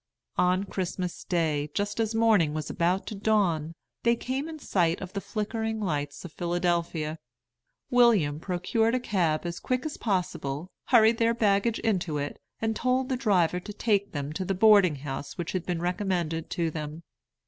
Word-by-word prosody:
On 180 Hz, +1 st, +3 dB
Christmas 185 Hz, -2 st, -4 dB
day, 155 Hz, -4 st, 0 dB
just 205 Hz, +1 st, -1 dB
as 225 Hz, 0 st, 0 dB
morning 210 Hz, -10 st, +3 dB
was 155 Hz, -1 st, -3 dB
about 180 Hz, +3 st, +1 dB
to -, -, -5 dB
dawn, 190 Hz, -7 st, +1 dB, 0.3 s
they 235 Hz, 0 st, +3 dB
came 265 Hz, +6 st, -3 dB
in 320 Hz, -, -7 dB
sight 175 Hz, -, +1 dB
of 185 Hz, 0 st, -7 dB
the 200 Hz, -, -3 dB
flickering 220 Hz, +1 st, -3 dB
lights 150 Hz, -6 st, -3 dB
of 175 Hz, -, -8 dB
Philadelphia. 170 Hz, -3 st, -1 dB, 0.7 s
William 215 Hz, -13 st, +4 dB
procured 205 Hz, +7 st, 0 dB
a -, -, +1 dB
cab 175 Hz, -10 st, 0 dB
as 170 Hz, 0 st, -4 dB
quick 255 Hz, +1 st, -1 dB
as 310 Hz, -, -4 dB
possible, 175 Hz, -6 st, -2 dB
hurried 230 Hz, -2 st, +5 dB
their 230 Hz, 0 st, +3 dB
baggage 215 Hz, +1 st, +2 dB
into 185 Hz, -8 st, 0 dB
it, 145 Hz, 0 st, -4 dB, 0.2 s
and 225 Hz, 0 st, -1 dB
told 255 Hz, +3 st, +1 dB
the 260 Hz, -, +1 dB
driver 185 Hz, -8 st, +2 dB
to 210 Hz, +3 st, -8 dB
take 205 Hz, -2 st, +1 dB
them 145 Hz, 0 st, -4 dB
to 190 Hz, -, -3 dB
the 195 Hz, +1 st, -1 dB
boarding 200 Hz, -5 st, +6 dB
house 140 Hz, 0 st, -6 dB
which 175 Hz, -2 st, -3 dB
had 185 Hz, -2 st, -3 dB
been 175 Hz, -2 st, -2 dB
recommended 175 Hz, -3 st, -1 dB
to 170 Hz, -3 st, -1 dB
them. 155 Hz, +1 st, -6 dB
185 Hz, 170 wpm, -27 LUFS, 165-220 Hz, 0.7 s, boarding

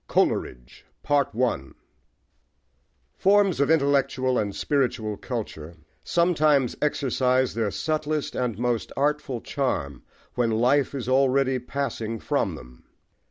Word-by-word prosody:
COLERIDGE* -, -, -1 dB, 2.4 s
FORMS 195 Hz, -3 st, +3 dB
of 140 Hz, -, +2 dB
intellectual 140 Hz, -4 st, +2 dB
and 100 Hz, -2 st, -2 dB
spiritual 125 Hz, -7 st, -1 dB
culture 95 Hz, -9 st, -6 dB, 0.3 s
sometimes 155 Hz, -6 st, +2 dB
exercise 130 Hz, -3 st, +1 dB
their 115 Hz, -2 st, 0 dB
subtlest 155 Hz, +4 st, -2 dB
and 120 Hz, -5 st, -2 dB
most 120 Hz, -1 st, -1 dB
artful 140 Hz, -3 st, 0 dB
charm 70 Hz, -, -2 dB, 0.3 s
when 120 Hz, -2 st, +1 dB
life 125 Hz, +6 st, +2 dB
is 125 Hz, -4 st, -4 dB
already 135 Hz, 0 st, +2 dB
passing 120 Hz, -3 st, -3 dB
from -, -, -1 dB
them. 60 Hz, 0 st, -14 dB
130 Hz, 100 wpm, -25 LUFS, 115-145 Hz, 2.4 s, FORMS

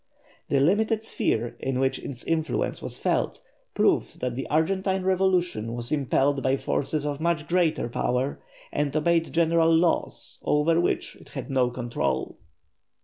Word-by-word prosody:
The 140 Hz, -, +3 dB
limited 215 Hz, -, +2 dB
sphere 120 Hz, -, -1 dB
in 130 Hz, -1 st, -1 dB
which 135 Hz, 0 st, +1 dB
its 125 Hz, -4 st, -7 dB
influence 160 Hz, -1 st, -1 dB
was -, -, -5 dB
felt -, -, -1 dB, 0.3 s
proves -, -, +2 dB
that 125 Hz, -1 st, -3 dB
the 135 Hz, -, -4 dB
Argentine 190 Hz, +4 st, +1 dB
revolution 180 Hz, -, +1 dB
was 120 Hz, 0 st, -5 dB
impelled 140 Hz, -1 st, +1 dB
by 130 Hz, +1 st, +2 dB
forces 145 Hz, +2 st, -1 dB
of 145 Hz, 0 st, -3 dB
much 165 Hz, -2 st, 0 dB
greater 170 Hz, -7 st, +1 dB
power, 125 Hz, +3 st, -1 dB, 0.3 s
and 145 Hz, 0 st, -1 dB
obeyed 165 Hz, +1 st, +2 dB
general 165 Hz, 0 st, +3 dB
laws 165 Hz, +1 st, 0 dB
over 165 Hz, +3 st, +2 dB
which -, -, -1 dB
it -, -, -17 dB
had 135 Hz, -1 st, -6 dB
no 130 Hz, -2 st, +2 dB
control. 120 Hz, -1 st, -2 dB
150 Hz, 145 wpm, -26 LUFS, 130-170 Hz, 0.3 s, The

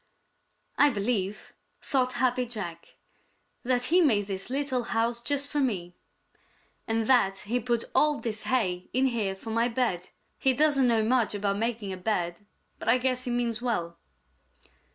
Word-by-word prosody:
"I 290 Hz, -, +7 dB
believe," 205 Hz, -3 st, -2 dB, 0.3 s
thought 255 Hz, -2 st, 0 dB
Happy 250 Hz, 0 st, +1 dB
Jack, 175 Hz, -8 st, -6 dB, 0.7 s
"that 250 Hz, -1 st, 0 dB
he 365 Hz, -, +6 dB
made 220 Hz, -, +3 dB
this 195 Hz, +1 st, -5 dB
little 270 Hz, -1 st, -1 dB
house 235 Hz, 0 st, -1 dB
just 280 Hz, +3 st, -1 dB
for 295 Hz, -, 0 dB
me, 190 Hz, -10 st, -1 dB, 0.9 s
and 225 Hz, 0 st, 0 dB
that 195 Hz, -6 st, +3 dB
he 235 Hz, +4 st, -1 dB
put 235 Hz, -1 st, 0 dB
all 300 Hz, -1 st, +3 dB
this 220 Hz, -2 st, -4 dB
hay 185 Hz, -8 st, 0 dB
in 260 Hz, +2 st, +3 dB
here 220 Hz, -7 st, 0 dB
for 220 Hz, +4 st, -8 dB
my 230 Hz, +1 st, +2 dB
bed. 230 Hz, -8 st, -1 dB, 0.3 s
He 265 Hz, -, +3 dB
doesn't 280 Hz, -1 st, +3 dB
know 225 Hz, -2 st, +3 dB
much 230 Hz, -2 st, +2 dB
about 200 Hz, 0 st, -1 dB
making 225 Hz, -4 st, -2 dB
a -, -, -6 dB
bed, 180 Hz, -2 st, -2 dB, 0.4 s
but -, -, -2 dB
I 240 Hz, -, +6 dB
guess 255 Hz, 0 st, 0 dB
he -, -, -3 dB
means 240 Hz, -1 st, -1 dB
well." 175 Hz, -9 st, -2 dB
235 Hz, 160 wpm, -28 LUFS, 205-255 Hz, 0.9 s, I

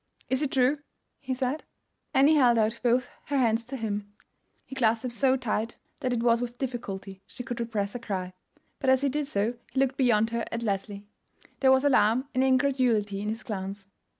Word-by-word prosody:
"Is 260 Hz, +2 st, +2 dB
it 295 Hz, -, 0 dB
true?" 265 Hz, +3 st, +3 dB, 0.4 s
he 260 Hz, -2 st, -3 dB
said. 260 Hz, +4 st, -2 dB, 0.5 s
Annie 280 Hz, +2 st, +5 dB
held 250 Hz, -6 st, +5 dB
out 220 Hz, +1 st, +1 dB
both 245 Hz, +1 st, +2 dB, 0.2 s
her 285 Hz, -, -1 dB
hands 230 Hz, -3 st, +2 dB
to 265 Hz, +3 st, -5 dB
him. 205 Hz, -3 st, -3 dB, 0.5 s
He -, -, -11 dB
clasped 230 Hz, -3 st, +2 dB
them 250 Hz, -, -3 dB
so 265 Hz, +2 st, +2 dB
tight 230 Hz, -2 st, -2 dB, 0.2 s
that 255 Hz, -4 st, -1 dB
it 235 Hz, -1 st, 0 dB
was 235 Hz, 0 st, +3 dB
with 245 Hz, 0 st, -4 dB
difficulty 200 Hz, -7 st, -5 dB
she 245 Hz, -, -7 dB
could 245 Hz, -1 st, -5 dB
repress 215 Hz, -4 st, -2 dB
a 245 Hz, -, -4 dB
cry; 185 Hz, -5 st, -4 dB, 0.5 s
but 265 Hz, -, +1 dB
as 260 Hz, 0 st, +5 dB
he 280 Hz, -, +2 dB
did 295 Hz, +1 st, -2 dB
so 215 Hz, -2 st, 0 dB, 0.2 s
he 265 Hz, -, -1 dB
looked 270 Hz, 0 st, +1 dB
beyond 230 Hz, -4 st, +3 dB
her 235 Hz, 0 st, -1 dB
at 230 Hz, 0 st, -3 dB
Leslie. 200 Hz, -1 st, -3 dB, 0.5 s
There 265 Hz, -1 st, +5 dB
was 265 Hz, +1 st, +4 dB
alarm 255 Hz, -2 st, +3 dB
and 255 Hz, -, +2 dB
incredulity 255 Hz, -7 st, +2 dB
in 210 Hz, -, -2 dB
his 220 Hz, 0 st, -4 dB
glance. 195 Hz, -1 st, -5 dB
240 Hz, 200 wpm, -27 LUFS, 215-265 Hz, 0.5 s, Annie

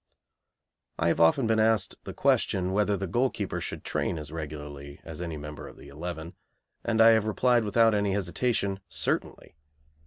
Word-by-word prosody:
I 85 Hz, -, +2 dB
have -, -, 0 dB
often 85 Hz, +10 st, +4 dB
been 110 Hz, 0 st, +2 dB
asked 110 Hz, -1 st, +1 dB
the -, -, -6 dB
question 95 Hz, -1 st, +1 dB
whether 105 Hz, 0 st, +2 dB
the 95 Hz, -, -3 dB
goalkeeper 120 Hz, +8 st, -1 dB
should -, -, -5 dB
train -, -, -1 dB
as 75 Hz, -2 st, -7 dB
regularly 75 Hz, -3 st, -7 dB
as 80 Hz, 0 st, -8 dB
any 85 Hz, -3 st, -4 dB
member 75 Hz, 0 st, -8 dB
of -, -, -13 dB
the 70 Hz, -, -13 dB
eleven, 80 Hz, +3 st, -6 dB, 0.5 s
and 115 Hz, -1 st, 0 dB
I 115 Hz, 0 st, +8 dB
have 110 Hz, -2 st, +4 dB
replied 120 Hz, +2 st, +2 dB
without 115 Hz, +1 st, +4 dB
any 100 Hz, -2 st, +1 dB
hesitation 100 Hz, +1 st, 0 dB
"Certainly." -, -, -3 dB
95 Hz, 165 wpm, -28 LUFS, 80-110 Hz, 0.5 s, I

